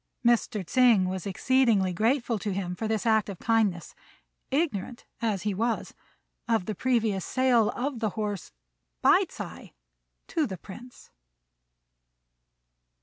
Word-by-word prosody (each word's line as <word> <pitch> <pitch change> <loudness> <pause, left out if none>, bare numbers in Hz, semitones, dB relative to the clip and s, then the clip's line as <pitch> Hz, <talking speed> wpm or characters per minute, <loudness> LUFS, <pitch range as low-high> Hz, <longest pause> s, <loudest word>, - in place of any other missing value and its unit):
Mr. 235 -4 +2
Tsêng 235 -2 +4
was 185 0 -4
exceedingly 210 -2 +2
grateful 230 +3 +1
to 205 +2 -3
him 185 -2 -3
for 220 +5 -3
this 220 0 -1
act 220 -2 +3
of 195 - -6
kindness, 215 -6 0 0.6
ignorant, 260 - -2 0.2
as 215 -5 -1
he 210 -1 0
was, 225 +4 -2 0.5
of 225 -5 +1
the 215 - -3
previous 220 -4 0
sale 250 -4 +2
of 260 0 -3
the 220 -1 0
horse 205 -4 -3 0.5
by - - +5
Ts'ui - - -9 0.5
to 310 -3 0
the 190 -4 -6
Prince. 240 +8 -13
220 Hz, 130 wpm, -27 LUFS, 195-240 Hz, 0.6 s, by